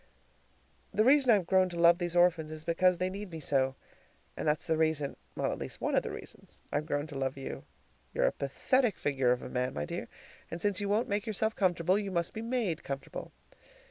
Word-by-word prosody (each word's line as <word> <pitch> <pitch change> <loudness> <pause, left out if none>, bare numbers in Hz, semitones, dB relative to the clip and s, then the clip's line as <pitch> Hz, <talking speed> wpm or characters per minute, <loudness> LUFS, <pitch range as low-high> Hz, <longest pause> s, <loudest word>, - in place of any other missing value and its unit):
The 215 - +3
reason 270 0 +5
I've 205 -6 +5
grown 185 +1 +3
to 170 -1 -5
love 170 +1 +6
these 175 -1 -2
orphans 175 -3 +3
is 155 0 -7
because 180 +2 +3
they 185 +2 -1
need 200 +1 -6
me 165 -2 -7
so, 135 -3 +1 0.6
and - - -3
that's 150 0 +1
the 160 - +1
reason 155 -3 0 0.2
at - - -1
least - - -6
one - - -1
of - - +4
the - - -5
reasons - - -9
I've 150 +1 -1
grown 145 -1 -1
to 155 -2 -10
love 135 0 -2
you. 135 - -6 0.5
You're - - +1
a - - +3
pathetic 235 - +1
figure 135 -3 +1
of 125 - 0
a - - -5
man, 125 0 -1
my 75 0 -2
dear, - - -5 0.4
and 170 - -5
since 205 +1 +1
you 200 - -2
won't 215 +4 +2
make 205 +3 -1
yourself 220 +1 0
comfortable, 180 0 +2
you 200 -2 -3
must 170 -2 -1
be 220 - -5
MADE 230 -8 -1
comfortable. 135 0 -6
170 Hz, 215 wpm, -31 LUFS, 150-200 Hz, 0.6 s, love